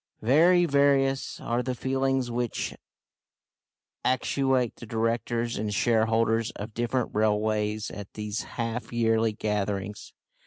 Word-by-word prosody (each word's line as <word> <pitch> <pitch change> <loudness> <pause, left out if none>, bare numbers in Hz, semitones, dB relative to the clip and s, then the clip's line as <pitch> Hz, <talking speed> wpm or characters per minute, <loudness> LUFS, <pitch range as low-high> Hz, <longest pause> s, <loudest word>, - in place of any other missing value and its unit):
Very 170 +9 +5
various 140 -2 +2
are 120 +1 -1
the 125 0 -3
feelings 130 -1 0
which 120 -1 -2 1.3
actuate 130 -1 +1
the 120 - -10
directors 115 +1 -1
and 105 -1 -2
shareholders 115 +1 +2
of 105 +2 -7
different 120 +2 -1
railways 105 0 0
at 100 -1 -8
these 105 -1 -3 0.2
half 115 0 -3
yearly 115 -1 +2
gatherings. 105 -1 -3
115 Hz, 110 wpm, -27 LUFS, 110-130 Hz, 1.3 s, Very